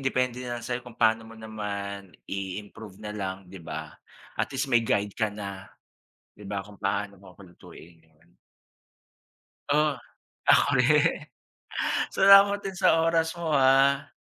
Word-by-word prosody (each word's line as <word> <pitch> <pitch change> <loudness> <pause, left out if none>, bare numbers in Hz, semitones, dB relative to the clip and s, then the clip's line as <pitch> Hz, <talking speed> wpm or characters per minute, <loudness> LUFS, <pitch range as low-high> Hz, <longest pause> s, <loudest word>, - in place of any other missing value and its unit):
Depende 125 -1 -1
nalang 120 -1 -5
sa'yo 125 0 -3
kung 120 -2 -13
paano 110 0 +3
mo 115 - -12
naman 100 -3 -6 0.2
i-improve 100 +1 -7
na 105 -1 -7
lang, 95 -2 -3
'di 95 0 -11
ba? 80 - -7 0.5
At - - -1
least 135 +1 -2
may 120 -1 +4
guide 100 -2 -1
kana. 100 -3 -4 0.7
'Di 105 - -13
ba? 100 0 -3
Kung 100 0 -15
paano 100 0 -2
mo 95 -1 -16
lulutuin. 85 -3 -15 1.7
Oo, 150 +1 +3 0.6
ako - - +6
rin. - - +2 0.8
Salamat 200 +1 +7
din 195 -1 -6
sa 165 - +4
oras 165 0 +1
mo, 170 -1 -5
ah. 135 +1 +3
110 Hz, 135 wpm, -26 LUFS, 100-135 Hz, 1.7 s, Salamat